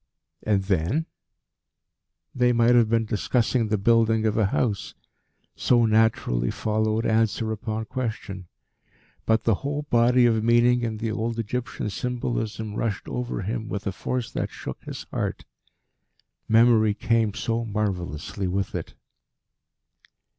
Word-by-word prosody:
"And 100 -3 +1
then?" 95 - 0 1.3
They 125 -1 +3
might 120 +1 +4
have 120 -3 +4
been 115 0 +2
discussing 115 +2 0
the 105 0 +1
building 115 +1 +3
of 110 -1 +1
a 110 -3 +3
house, 100 -1 -1 0.6
so 120 -2 +3
naturally 110 - +2
followed 110 +1 0
answer 110 0 +1
upon 110 +1 -3
question. 110 -7 -5 0.8
But 110 0 +3
the 115 - +3
whole 145 +1 -2
body 120 +1 +5
of 110 -2 +2
meaning 120 +1 +4
in 115 -2 -2
the 110 0 -2
old 115 +1 -2
Egyptian 115 -1 -3
symbolism 110 -2 -3
rushed 105 -1 -2
over 125 -5 -3
him 110 +2 -3
with 100 -1 -4
a 100 - 0
force 125 +5 -3
that - - -2
shook - - -8
his - - -6
heart. - - -3 1.0
Memory 110 -2 +5
came 115 -3 +1
so 115 0 -1
marvellously 100 -4 -3
with 95 +2 -2
it. - - -5
110 Hz, 130 wpm, -25 LUFS, 105-120 Hz, 1.3 s, body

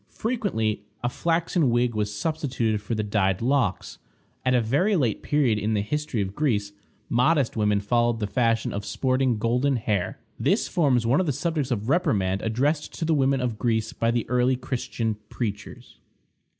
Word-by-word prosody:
Frequently 190 - -1 0.2
a 120 - +1
flaxen 165 0 +1
wig 120 0 +2
was 105 -1 -1
substituted 120 -3 -1
for 115 +2 -3
the 110 - -1
dyed 95 -3 +1
locks. 125 -5 0 0.4
At 130 0 +2
a - - +5
very 145 - +2
late 125 - 0
period 130 -8 +1
in 110 +1 0
the 100 - 0
history 150 -2 -2
of 95 0 -6
Greece, 105 -7 0 0.4
modest 135 +2 +2
women 105 -2 +2
followed 120 +2 +1
the 105 - -1
fashion 115 +1 0
of 100 - -3
sporting 130 +1 0
golden 125 +5 +1
hair. 105 -6 -1 0.2
This - - +1
forms 135 -8 +2
one 125 +5 +3
of 185 - 0
the - - +2
subjects 155 -1 -2
of 110 -4 -2
reprimand 100 - +1
addressed 140 +7 -1
to 165 - -2
the 160 - +2
women 135 -2 +2
of 120 -3 -2
Greece 110 -2 0
by 115 - 0
the 120 -1 0
early 125 +1 +2
Christian 120 -4 -3
preachers. 105 -4 -6
120 Hz, 175 wpm, -25 LUFS, 105-140 Hz, 0.4 s, a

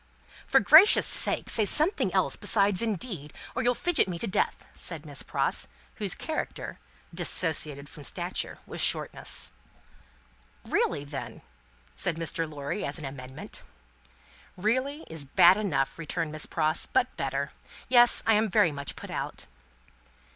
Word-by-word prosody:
"For - - +5
gracious 330 +7 +7
sake - - 0
say 220 - +1
something 310 - +1
else - - +1
besides 200 -3 +2
'indeed,' 195 - -3 0.2
or 255 - -1
you'll 245 0 +1
fidget 350 - +2
me 180 -2 -4
to 200 - -3
death," 190 - -1
said 160 -4 -6
Miss 145 -2 -5
Pross: - - +1 0.3
whose - - +2
character - - -5 0.3
(dissociated 155 -4 +2
from 150 0 -13
stature) - - -2
was - - -4
shortness. - - +2 1.1
"Really, 145 - 0
then?" 140 -1 -8 0.5
said 165 - -1
Mr. 165 0 -3
Lorry, 145 +7 -5
as 140 - -4
an 155 - -7
amendment. 130 -1 -9 1.0
"Really, 260 - -1
is 160 -3 -7
bad 170 +6 +6
enough," 165 -10 -2
returned 165 0 -3
Miss 155 -1 -3
Pross, 155 0 -1
"but 390 -1 0
better. - - -3 0.4
Yes, 240 -1 +6
I 225 - +4
am 215 +1 +2
very 170 -2 +3
much 140 -1 -6
put - - -10
out." - - -5
170 Hz, 140 wpm, -27 LUFS, 145-225 Hz, 1.1 s, gracious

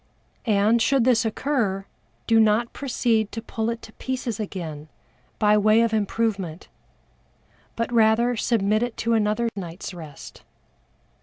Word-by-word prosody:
And 215 +2 +3
should 270 +1 +3
this 240 -2 +3
occur, 220 -5 -1 0.4
do 225 -1 +4
not 220 +2 +3
proceed 235 -5 0
to 225 - -3
pull 225 0 -3
it 235 0 -4
to 220 - -12
pieces 255 -4 -4
again, 160 -7 -6 0.5
by 210 0 +4
way 215 +2 +4
of 230 -1 +1
improvement, 205 -5 -2 1.1
but 230 +1 -2
rather 230 +2 +3
submit 215 -2 +1
it 240 -1 -3
to 230 0 0
another 215 +1 +1
night's 180 -1 -7
rest. 160 -5 -11
220 Hz, 135 wpm, -24 LUFS, 205-235 Hz, 1.1 s, do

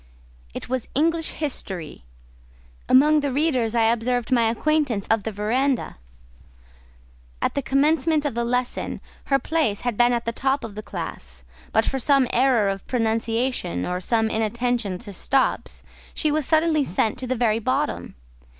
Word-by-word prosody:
It - - -6
was 255 -1 -2
English 325 +3 +1
history: 190 - -4 0.8
among 300 +4 +6
the 285 -2 -1
readers 255 -5 +1
I 230 - +3
observed 235 +2 0
my 235 -3 +4
acquaintance 270 -4 0
of 225 -1 +3
the 220 - -2
verandah: 240 - -1 1.4
at - - 0
the 280 - -1
commencement 300 +4 +2
of 290 - -1
the 235 +1 -1
lesson, 250 +1 -2 0.3
her 275 - +3
place 275 -7 -1
had 245 -4 -2
been 240 0 +4
at 235 -1 -1
the 230 - 0
top 270 +4 0
of 225 - -6
the 210 - -6
class, - - -7 0.3
but 220 - +2
for 270 - -1
some 275 0 +3
error 245 -5 +3
of 195 0 -3
pronunciation, 225 - -1
or 180 0 -3
some 225 +3 +1
inattention 225 -2 -1
to 200 +2 -9
stops, 265 +8 0 0.3
she 305 - +1
was 305 -2 0
suddenly 315 -1 +3
sent 220 +1 -1
to 255 - -4
the 255 - 0
very 225 -2 +1
bottom. 265 +6 -2
245 Hz, 160 wpm, -23 LUFS, 220-275 Hz, 1.4 s, among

